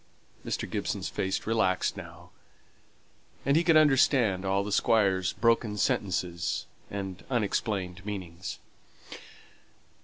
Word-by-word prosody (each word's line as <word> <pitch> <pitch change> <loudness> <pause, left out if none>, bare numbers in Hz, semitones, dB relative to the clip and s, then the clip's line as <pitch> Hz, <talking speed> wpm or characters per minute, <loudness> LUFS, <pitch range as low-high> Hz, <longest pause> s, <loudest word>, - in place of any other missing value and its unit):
Mr. - - -3
Gibson's - - -3
face 95 0 -2
relaxed 110 -5 +1
now, - - -11 1.1
and 140 +1 +3
he 165 - +4
could 165 -2 +5
understand 130 -9 +4
all 95 +1 +1
the 105 - -5
Squire's 95 -3 +2
broken 115 -2 +1
sentences 90 -4 -1 0.2
and 95 -2 -5
unexplained 100 -5 -1
meanings. 95 -1 -6
100 Hz, 100 wpm, -28 LUFS, 95-115 Hz, 1.1 s, could